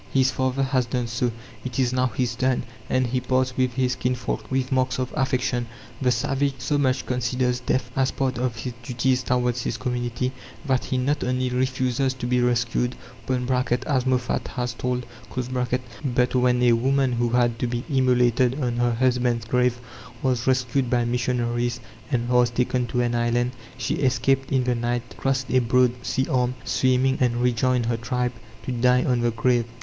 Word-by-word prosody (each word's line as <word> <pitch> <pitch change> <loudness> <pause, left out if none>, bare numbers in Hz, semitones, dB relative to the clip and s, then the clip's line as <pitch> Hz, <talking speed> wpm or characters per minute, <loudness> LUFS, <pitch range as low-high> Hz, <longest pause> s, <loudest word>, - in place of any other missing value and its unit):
His 130 -1 +3
father 130 +1 0
has 130 -2 +1
done 125 +1 -1
so, 120 +1 -1 0.3
it 130 -2 -5
is 130 -2 +2
now 130 0 +2
his 120 0 -1
turn; 130 +1 +1 0.3
and 130 0 +2
he 125 +1 0
parts 130 0 0
with 130 -1 +1
his 125 -1 +1
kinsfolk 125 0 -2
with 130 0 -1
marks 130 -1 +1
of 130 -1 -3
affection. 130 -2 0 0.3
The 130 - +3
savage 135 +3 0
so 130 +4 0
much 130 -2 +1
considers 125 0 0
death 125 0 -1
as 130 0 +2
part 130 -3 -1
of 125 -2 -1
his 120 +2 -5
duties 125 +1 0
towards 125 -1 0
his 115 - -2
community, 125 0 -2 0.3
that 130 -3 +1
he 130 - -1
not 140 +4 0
only 125 0 0
refuses 130 +1 0
to 125 - -5
be 125 0 +2
rescued 120 0 +1 0.3
(as 125 +1 0
Moffat 125 -2 0
has 125 -2 -3
told), 125 0 -2 0.3
but 125 0 -1
when 125 -1 +3
a 120 - +6
woman 135 +2 +2
who 120 0 +1
had 120 -1 +2
to 125 - 0
be 120 0 -3
immolated 125 -2 +2
on 120 -3 -1
her 120 0 +2
husband's 125 -1 +1
grave 125 -1 +1 0.4
was 125 -2 0
rescued 130 0 +1
by 120 -1 +2
missionaries, 120 0 -1 0.3
and 120 -1 0
was 125 -1 +4
taken 125 +1 0
to 125 +1 0
an 120 0 0
island, 120 +1 +1 0.3
she 125 - -1
escaped 135 +1 +1
in 130 -2 +2
the 125 0 +1
night, 120 0 -1
crossed 135 -1 -1
a 130 - +5
broad 125 +1 +3
sea 130 +1 0
arm, 125 -1 +1
swimming 130 +1 +2
and 120 -1 +2
rejoined 125 0 +2
her 115 0 0
tribe, 125 +1 -1 0.3
to - - -2
die 125 +1 +3
on 125 -2 +1
the 120 - +2
grave. 120 +1 +1
125 Hz, 180 wpm, -24 LUFS, 120-130 Hz, 0.4 s, a